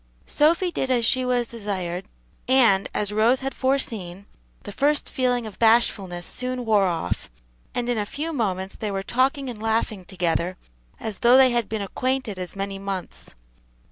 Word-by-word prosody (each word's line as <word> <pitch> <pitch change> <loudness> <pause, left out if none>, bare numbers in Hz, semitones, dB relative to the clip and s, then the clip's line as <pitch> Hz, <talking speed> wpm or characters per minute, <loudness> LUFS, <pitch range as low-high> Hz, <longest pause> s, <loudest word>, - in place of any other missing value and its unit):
Sophy 335 +4 +2
did 265 - -2
as 245 -3 +2
she 255 +3 +4
was 245 -2 0
desired, 190 -5 -4 0.4
and, 235 -7 +4
as 210 -1 +1
Rose 225 +5 +3
had 270 +1 -3
foreseen, 215 -9 -2 0.4
the 205 - -7
first 285 +7 +1
feeling 250 -3 +1
of 215 - -9
bashfulness 210 -6 +2
soon 250 -1 -4
wore 210 -3 +4
off, 170 -2 -3 0.5
and 245 -1 -1
in 240 -2 0
a 205 - -1
few 315 +7 -4
moments 190 -7 -2
they 215 - -4
were 195 -1 -3
talking 265 +5 +1
and 230 -4 -6
laughing 220 -3 -1
together 180 -1 -1 0.4
as 215 -3 -5
though 245 +2 +6
they 260 -1 +6
had 235 -4 0
been 215 -2 -2
acquainted 255 -1 -2
as 180 +1 -5
many 195 0 -4
months. 195 -2 -6
225 Hz, 170 wpm, -24 LUFS, 195-255 Hz, 0.5 s, though